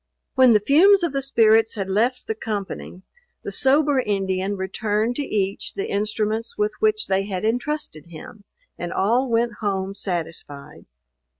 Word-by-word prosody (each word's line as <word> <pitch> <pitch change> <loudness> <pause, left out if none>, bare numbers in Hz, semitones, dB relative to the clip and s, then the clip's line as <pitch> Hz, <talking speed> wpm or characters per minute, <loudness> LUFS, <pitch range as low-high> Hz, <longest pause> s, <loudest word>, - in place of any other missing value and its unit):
When 260 -3 +6
the 210 - +5
fumes 345 - +5
of 335 -5 -1
the 275 - -1
spirits 225 -4 +3
had 195 -3 -3
left 235 +6 0
the - - -2
company, 205 -4 -6 0.4
the - - -5
sober 280 +1 +3
Indian 195 -3 -1
returned 210 +4 -1
to - - -1
each 200 -7 -2
the 195 - -4
instruments 215 +2 -2
with 210 0 0
which 215 0 +2
they 195 0 0
had 195 0 -4
entrusted 245 - -3
him, 170 +5 -12 0.4
and 175 - -4
all 240 +7 +1
went 230 -1 0
home 195 -2 -2
satisfied. 165 -7 -5
215 Hz, 155 wpm, -22 LUFS, 195-245 Hz, 0.4 s, When